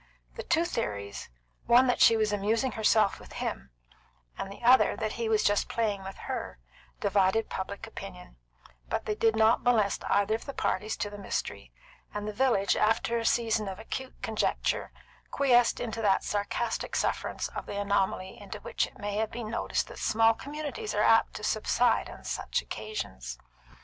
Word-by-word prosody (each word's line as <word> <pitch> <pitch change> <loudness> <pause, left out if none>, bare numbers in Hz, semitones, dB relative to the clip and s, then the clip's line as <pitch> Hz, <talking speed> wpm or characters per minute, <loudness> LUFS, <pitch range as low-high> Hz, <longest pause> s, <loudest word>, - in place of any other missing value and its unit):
The - - -6
two 330 +2 +1
theories, 100 - -4 0.4
one 245 +2 +7
that 250 - +1
she 225 - +7
was 215 -1 +1
amusing 220 +5 +1
herself 220 -2 +3
with - - -13
him, 65 +1 -4 0.7
and 195 - -5
the 200 - -11
other 250 +2 +6
that 215 -1 -2
he 230 0 -2
was 220 -1 +3
just 205 0 +2
playing 210 -4 -1
with 195 0 -8
her, - - -4 0.4
divided 200 +3 +2
public 195 +1 -4
opinion, 190 - -10 0.5
but - - -2
they 215 - 0
did 220 +1 +2
not 220 +1 +4
molest 220 -5 +2
either 205 +1 +3
of 225 - -3
the 275 - -6
parties 210 +4 -1
to 205 - -3
the 205 - -8
mystery; 200 - -4 0.4
and 210 0 -3
the 210 - -3
village, 230 -4 +2
after 225 +2 +2
a 230 - -4
season 225 -3 +1
of 190 -1 -5
acute 260 +4 -6
conjecture, 220 -1 -1 0.4
quiesced 245 -4 +3
into 225 -1 -3
that 200 -3 +3
sarcastic 210 +3 -2
sufferance - - -1
of - - -7
the 200 - -4
anomaly 195 -2 -1
into 205 +1 -7
which - - -1
it - - -17
may 205 0 -3
have 220 0 0
been 230 -2 -6
noticed 230 - -1
that - - -10
small 225 +1 +4
communities 300 - -5
are - - +2
apt - - +4
to - - -7
subside - - +2
from - - -11
such - - -2
occasions. 65 - -6
215 Hz, 175 wpm, -29 LUFS, 200-230 Hz, 0.7 s, one